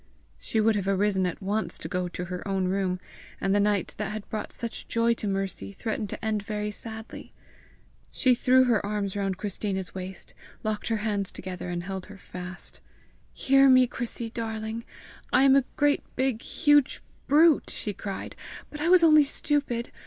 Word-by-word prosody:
She 220 - -1
would 220 0 +3
have 195 -2 -1
arisen 195 -1 +2
at 180 - -6
once 195 -3 0
to - - -6
go 180 +1 -2
to 180 0 -5
her 180 +2 -6
own 190 -1 0
room, 185 -1 0 0.4
and 195 - +1
the 205 - +3
night 205 -2 +1
that 210 -1 -2
had 215 -1 -6
brought 215 - -4
such 235 -1 -5
joy 230 0 +2
to 220 - -4
Mercy 195 - -2
threatened 215 - -3
to 225 - -6
end 215 -1 0
very 210 0 -3
sadly. 220 +1 -6 0.8
She 255 -2 +3
threw 255 +1 +5
her 235 -5 +2
arms 205 -1 -2
round 195 -2 -1
Christina's 195 -2 -3
waist, 190 0 -7 0.3
locked 215 -1 -2
her 225 - +1
hands 200 -3 -1
together, 180 -1 -6
and 175 0 -3
held 190 0 -5
her 205 -1 -11
fast. 180 0 -9 0.5
"Hear 275 0 +4
me, 255 -1 +7
Chrissy, 235 -1 -4
darling! 225 0 -4 0.5
I - - +5
am 270 0 +6
a 275 -2 +4
great 290 0 +3
big 260 -3 0
huge 290 -3 +2 0.2
brute," 310 +2 +5
she 210 - -4
cried. 195 +1 -6 0.4
"But 300 - -7
I 325 - +1
was 365 -1 +7
only 310 -2 +7
stupid. 280 -4 -1
210 Hz, 180 wpm, -27 LUFS, 195-240 Hz, 0.8 s, me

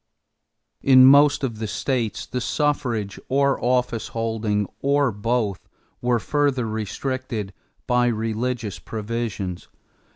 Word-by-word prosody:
In 130 -1 +7
most 145 +2 +6
of 115 -5 -2
the 110 - -3
states 120 -1 -2
the 125 - -4
suffrage 120 -9 -1
or 140 0 +2
office 125 -2 0
holding 110 -2 -1 0.2
or 140 -2 +2
both 105 -1 -2 0.3
were 120 0 +2
further 135 0 0
restricted 110 0 -4 0.3
by 125 0 +2
religious 115 -1 -2
provisions. 110 -4 -4
120 Hz, 105 wpm, -23 LUFS, 110-130 Hz, 0.3 s, In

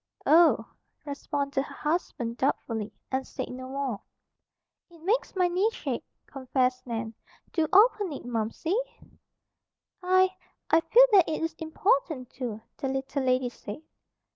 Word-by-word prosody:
"Oh!" 330 +2 +5 0.4
responded 280 -1 -2
her 275 - -8
husband 275 -7 -2
doubtfully, 225 -5 -1 0.2
and 265 0 -1
said 260 - -5
no 255 +1 -7
more. 270 -6 -3 0.9
"It 340 -1 -17
makes 425 +4 0
my 365 -1 +3
knees 380 +6 +1
shake," - - -3 0.2
confessed 255 -1 -1
Nan. 225 -1 -3 0.4
"Do 325 -3 +2
open 410 -2 +5
it, 280 - -7
Momsey!" 230 - -2 1.3
"I, 370 +1 +3 0.4
I 325 - +6
feel - - +7
that 385 -6 +6
it 315 - -2
is 325 0 -1
important, 315 - 0
too," 235 -4 -5 0.2
the 270 - -3
little 270 +1 -2
lady 255 -1 +2
said. 230 +4 -9
280 Hz, 135 wpm, -28 LUFS, 255-345 Hz, 1.3 s, feel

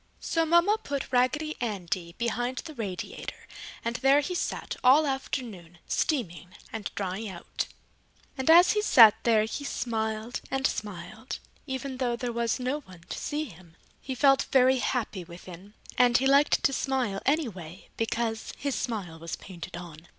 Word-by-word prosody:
So 330 -1 0
Mama 345 +6 +4
put 280 -1 -4
Raggedy 295 +5 +1
Andy 180 -6 -3
behind 245 +2 -1
the 315 - -7
radiator 205 -8 -6 0.4
and 235 +1 -1
there 270 +2 +5
he 330 +6 -3
sat 355 - -3
all 275 +5 +7
afternoon, 230 - -4
steaming 180 - -1 0.2
and 220 -2 -4
drying 195 +2 -3
out. 175 -3 -4 0.7
And 265 +2 -2
as 345 +2 +8
he 420 - +1
sat 230 - +8
there 225 -2 +4
he 225 +6 -4
smiled 220 -2 -2
and 270 0 -1
smiled, 210 +3 -4 0.3
even 265 0 -4
though 245 -2 0
there 240 0 -3
was 235 +1 0
no 255 +4 -1
one 185 - -15
to - - -4
see 300 +1 -2
him. 175 - -15 0.2
He 265 - -5
felt 275 0 +4
very 260 0 +5
happy 220 -7 -2
within 180 +3 -12 0.2
and 245 -1 +6
he 265 - 0
liked 280 +2 +4
to 275 - +3
smile, 255 -8 -1
anyway, 195 - -2
because 225 0 -2
his 280 -1 -2
smile 200 -11 -3
was 165 0 -5
painted 175 -1 -9
on. 170 -1 -10
235 Hz, 160 wpm, -28 LUFS, 190-270 Hz, 0.7 s, as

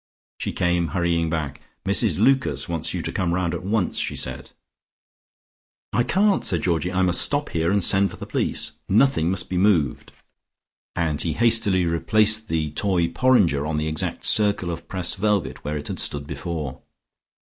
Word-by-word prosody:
She - - -3
came 90 -1 0
hurrying 85 -2 +1
back. 80 -4 -4 0.2
"Mrs 100 -3 +2
Lucas 135 -5 +2
wants 85 -3 -3
you - - -4
to - - -3
come 90 -2 -1
around 90 -2 -1
at - - -5
once," 100 -1 0
she - - -1
said. 65 0 -3 1.4
"I - - +2
can't," 195 +9 +2
said 85 -5 +1
Georgie. 85 0 0
"I 95 0 +1
must 90 -1 +4
stop 145 0 0
here 80 +1 0
and 100 -2 +2
send 95 +3 +4
for - - -11
the - - -7
police. - - -1 0.2
Nothing 105 -6 +3
must 95 0 0
be 90 - -3
moved," 90 -10 +1 0.8
and 80 -4 -1
he 80 - -1
hastily 115 -4 +2
replaced 110 +6 +2
the 80 -2 -1
toy 85 0 0
porringer 85 - +2
on 80 -1 -2
the 75 +1 -1
exact 80 -1 -2
circle 100 -4 +1
of 85 0 -7
pressed 90 -2 -2
velvet 105 +1 -1
where 75 +1 -3
it 75 - -7
had - - -5
stood 70 -1 -3
before. 75 -2 -5
90 Hz, 175 wpm, -23 LUFS, 80-105 Hz, 1.4 s, must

